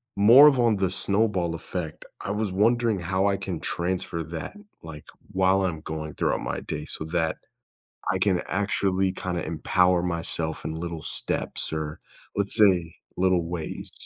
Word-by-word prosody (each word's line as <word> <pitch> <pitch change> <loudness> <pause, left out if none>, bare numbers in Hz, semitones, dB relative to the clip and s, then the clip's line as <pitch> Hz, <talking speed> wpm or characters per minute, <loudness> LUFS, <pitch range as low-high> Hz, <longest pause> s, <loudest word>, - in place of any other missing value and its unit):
more 120 +9 +9
of 135 -4 +4
on 115 -3 +4
the 95 -2 +1
snowball 100 -3 +1
effect, 80 -1 -6 0.2
I 100 - -3
was 105 -2 -1
wondering 115 +1 +2
how 95 +3 0
I 100 -1 +1
can 90 -4 -4
transfer 85 -1 -2
that, 80 - -7 0.3
like, 80 -2 -9 0.3
while 95 +1 +3
I'm 80 -4 -3
going 80 -1 -5
throughout - - 0
my - - -3
day 75 0 -5
so 80 - -6
that 80 -1 0 0.8
I 95 - 0
can 95 -2 +2
actually 95 -1 0
kinda 90 -2 -3
empower 90 +2 +2
myself 85 -2 -2
in - - -2
little 85 0 -5
steps, - - -3
or, 80 -1 -4 0.4
let's 100 0 +1
say, 90 -7 +4 0.2
little 90 -2 +3
ways. 85 -3 -5
90 Hz, 160 wpm, -26 LUFS, 80-100 Hz, 0.8 s, more